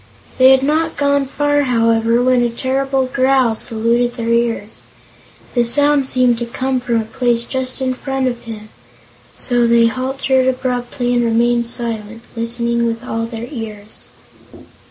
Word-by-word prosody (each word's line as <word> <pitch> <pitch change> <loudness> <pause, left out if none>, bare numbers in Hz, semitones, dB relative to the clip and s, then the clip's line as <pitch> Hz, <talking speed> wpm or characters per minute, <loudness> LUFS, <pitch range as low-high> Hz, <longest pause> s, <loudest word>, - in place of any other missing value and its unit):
They 260 0 +8
had 265 0 +5
not 315 +3 0
gone 280 -1 +1
far, 290 +1 +1
however, 230 -2 +2
when 255 -1 +3
a 240 - +1
terrible 265 +2 -1
growl 260 -2 +2
saluted 235 +2 -1
their 230 -2 -3
ears. 230 -2 -1 0.7
The 240 - +2
sound 285 +3 +3
seemed 250 -3 +2
to 240 - -2
come 260 +2 -2
from 240 -2 0
a 220 - -3
place 235 +1 0
just 260 +1 -3
in 255 0 0
front 270 0 -2
of 240 -1 -5
them, 215 -1 -8 0.7
so 245 -2 +1
they 235 0 +4
halted 260 +2 0
abruptly 250 -1 -1
and 240 0 +2
remained 235 +1 +1
silent, 230 -2 -3
listening 235 0 -1
with 230 +1 -4
all 230 -2 -3
their 230 0 -7
ears. 215 -5 -7
240 Hz, 155 wpm, -17 LUFS, 230-260 Hz, 0.7 s, They